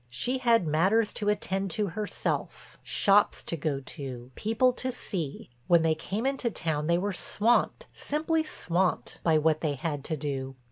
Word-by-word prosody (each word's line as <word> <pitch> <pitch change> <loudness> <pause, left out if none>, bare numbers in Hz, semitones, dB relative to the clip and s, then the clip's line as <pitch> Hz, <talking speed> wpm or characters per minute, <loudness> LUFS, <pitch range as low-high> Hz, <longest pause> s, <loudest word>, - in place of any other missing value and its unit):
She 245 - 0
had 235 -6 +3
matters 190 +9 +2
to 210 - -1
attend 195 -1 -1
to 210 - +1
herself, 210 +4 -3
shops 205 +1 +3
to - - -3
go 150 -3 -2
to, 130 -3 -7
people 225 - +2
to 255 +1 -2
see; 170 - -4 0.2
when 170 -2 +5
they 160 -1 +3
came 200 +8 -4
into 270 -3 0
town 155 -6 -2
they 170 0 +3
were 200 +3 -1
swamped, 235 - +1
simply 315 +2 0
swamped, 185 - -1
by 160 -2 +3
what 155 0 +2
they 150 -3 0
had 145 0 -3
to 155 - -2
do. 135 -2 -4
180 Hz, 170 wpm, -28 LUFS, 155-225 Hz, 0.2 s, when